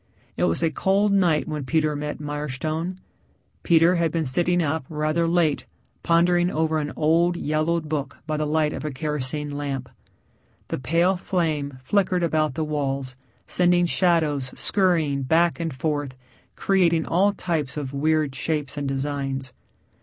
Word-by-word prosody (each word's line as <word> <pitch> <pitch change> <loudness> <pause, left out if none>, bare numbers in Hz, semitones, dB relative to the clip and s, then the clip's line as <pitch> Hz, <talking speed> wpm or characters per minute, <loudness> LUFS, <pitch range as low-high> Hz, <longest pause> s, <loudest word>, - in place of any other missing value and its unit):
It - - +1
was 85 - 0
a 165 - +2
cold 195 +6 +2
night 175 -6 +2
when 150 -2 -3
Peter 155 +2 +1
met 150 +1 -4
Mirestone. 150 +4 -3 0.7
Peter 170 +1 +4
had 165 -2 +1
been 165 -1 -1
sitting 175 +6 +1
up 155 0 -1
rather 155 +2 0
late 165 -3 +1 0.3
pondering 175 +1 +3
over 160 -1 0
an 150 -1 -3
old, 170 +3 +2
yellowed 155 +1 0
book 145 -3 -3
by 155 0 -2
the 150 0 -1
light 155 0 +1
of - - -5
a 155 - -2
kerosene 145 0 -3
lamp. 135 -3 -4 0.8
The - - -2
pale 170 +8 +2
flame 155 -7 -2
flickered 185 +2 +1
about 155 -4 +1
the 160 - -1
walls 135 -3 -2 0.3
sending 175 0 +3
shadows 160 -7 +1
scurrying 165 -8 +2
back 165 +6 +2
and 165 -1 -2
forth 145 -1 -3 0.4
creating 170 -4 +2
all 195 +4 +3
types 160 -8 -3
of 140 -2 -4
weird 155 0 +1
shapes 145 +1 -2
and 145 -1 -2
designs. 135 -1 -2
155 Hz, 150 wpm, -24 LUFS, 145-170 Hz, 0.8 s, Peter